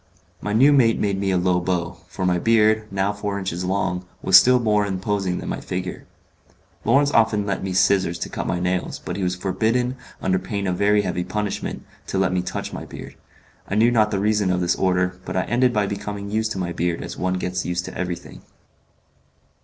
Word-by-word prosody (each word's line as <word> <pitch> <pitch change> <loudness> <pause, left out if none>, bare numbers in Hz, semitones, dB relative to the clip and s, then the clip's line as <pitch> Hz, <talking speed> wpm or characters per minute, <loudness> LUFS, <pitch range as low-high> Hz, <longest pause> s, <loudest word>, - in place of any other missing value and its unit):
My 105 - -3
new 135 +7 +5
mate 115 -5 +4
made 100 -2 0
me 100 0 0
a 95 - +2
low 90 0 +2
bow, 85 -1 -2
for 95 +1 -4
my 90 -1 +2
beard, 110 0 +3
now 100 +1 0
four 100 -1 -3
inches 95 -2 -3
long, 90 -1 -1 0.2
was 95 - +4
still 125 +6 +8
more 105 -3 +2
imposing 95 -1 -1
than - - -6
my - - -3
figure. 90 0 -5 0.8
Lawrence 140 +5 +4
often 110 -4 +3
lent 100 -2 -2
me 95 - -2
scissors 95 -2 +2
to - - -4
cut - - -4
my 90 - -1
nails, 90 0 -1
but - - -6
he 100 - -4
was 90 -1 0
forbidden, 110 +7 0 0.2
under 95 0 +1
pain 100 +2 -4
of 90 -1 0
very 105 +2 +3
heavy 90 -2 -2
punishment, 105 +2 -4 0.2
to - - -2
let 95 -1 +2
me 90 - +1
touch - - -5
my - - -5
beard. - - -9 0.6
I 100 - -1
knew 115 +3 +4
not 110 -3 +3
the 100 - -1
reason 105 -1 +1
of 90 - +1
this 90 -1 +1
order, 90 -1 0
but - - -4
I 90 - +2
ended 125 +3 +2
by 105 -3 +1
becoming 100 0 -5
used 110 +1 0
to - - -7
my 90 -2 -2
beard 85 0 -1
as - - -6
one 90 0 -1
gets 90 0 -2
used 90 0 -2
to - - -8
everything. 90 -1 -5
95 Hz, 215 wpm, -22 LUFS, 90-105 Hz, 0.8 s, still